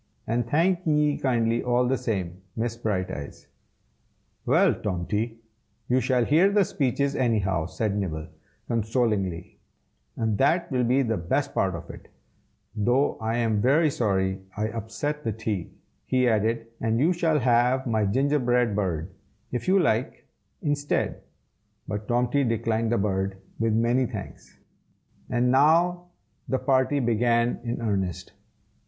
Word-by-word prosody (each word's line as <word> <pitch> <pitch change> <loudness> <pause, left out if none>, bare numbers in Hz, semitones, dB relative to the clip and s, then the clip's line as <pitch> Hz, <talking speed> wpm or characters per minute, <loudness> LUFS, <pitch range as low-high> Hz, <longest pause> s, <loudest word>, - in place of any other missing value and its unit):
And 120 +1 -1
thank 170 +5 +2
ye 150 -1 +3
kindly 115 -3 +1
all 125 0 +1
the 130 - +2
same, 95 -7 -3
Miss 115 +1 -2
Brighteyes." 95 -10 -4 1.0
"Well, - - +4
Tomty, 105 +4 -3 0.5
you 125 +1 +3
shall 125 -1 +1
hear 165 +9 +4
the 200 -1 +3
speeches, 140 - 0
anyhow," 100 -9 +1
said 105 +2 -2
Nibble, 80 -6 -3 0.4
consolingly, 110 -6 -1 0.6
"and 110 -2 -1
that 160 +5 +2
will 125 -1 +1
be 130 +3 +3
the 115 -3 -1
best 135 +12 -1
part 95 -2 0
of 85 - -8
it; - - -13 0.7
though 120 +6 +1
I 110 +1 -1
am 110 -3 +1
very 150 +5 +3
sorry 95 -5 0 0.2
I 110 +1 -1
upset 115 +7 -4
the 115 - -1
tea," 105 -5 -3 0.4
he 130 -1 +2
added, 115 +1 +1
"and 115 0 0
you 165 +7 +3
shall 165 -3 +1
have 125 0 +2
my 110 -3 +1
gingerbread 125 -2 +1
bird, 90 -3 -2 0.4
if 125 - -3
you 190 +1 +4
like, 125 - 0 0.4
instead." 145 -1 -1 0.7
But 105 0 -4
Tomty 125 +3 +1
declined 115 -1 0
the 120 - +2
bird, 95 -1 -1 0.2
with 115 -1 +1
many 120 +3 +2
thanks; - - -9 0.7
and 125 0 +2
now 170 +6 +3 0.4
the 130 - +1
"party" 130 +2 +2
began 120 0 +1
in 120 0 -3
earnest. 95 -6 -2
115 Hz, 135 wpm, -26 LUFS, 105-130 Hz, 1.0 s, Well